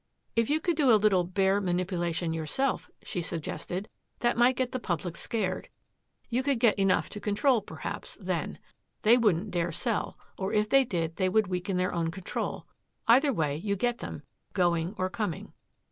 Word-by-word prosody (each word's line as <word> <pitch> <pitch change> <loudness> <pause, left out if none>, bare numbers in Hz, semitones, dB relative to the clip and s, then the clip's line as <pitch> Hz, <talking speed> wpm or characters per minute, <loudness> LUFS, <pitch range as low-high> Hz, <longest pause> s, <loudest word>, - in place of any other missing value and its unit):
"If 230 -1 +2
you 305 +2 +3
could 345 +1 0
do 285 -5 +4
a 220 - +7
little 200 -4 +3
bear 190 +2 +2
manipulation 175 -2 -1
yourself," 165 - -1
she 180 - -3
suggested. 175 +3 -4 0.3
"That 240 0 +2
might 240 +2 +4
get 255 0 -1
the 255 - -2
public 175 -4 -3
scared. 195 -5 -2 0.6
You 245 +1 0
could 270 -2 +1
get 225 -3 +4
enough 195 -1 +3
to 210 - -6
control, 215 +4 +2
perhaps, - - -6
then. - - -2 0.5
They 225 +2 +7
wouldn't 210 -4 +2
dare 175 -1 0
sell 230 +6 -2 0.2
or 190 +2 -2
if 210 0 +2
they 270 +2 +5
did 165 -6 -2
they 185 -1 +2
would 215 +3 +3
weaken 180 0 -2
their 185 0 0
own 165 -1 0
control. 180 +2 -4 0.4
Either 265 +5 +6
way, 150 - 0
you 200 +5 -1
get 240 +4 0
them, - - -6 0.3
going 175 0 +1
or 185 - 0
coming." 185 -4 -4
195 Hz, 175 wpm, -29 LUFS, 175-235 Hz, 0.6 s, a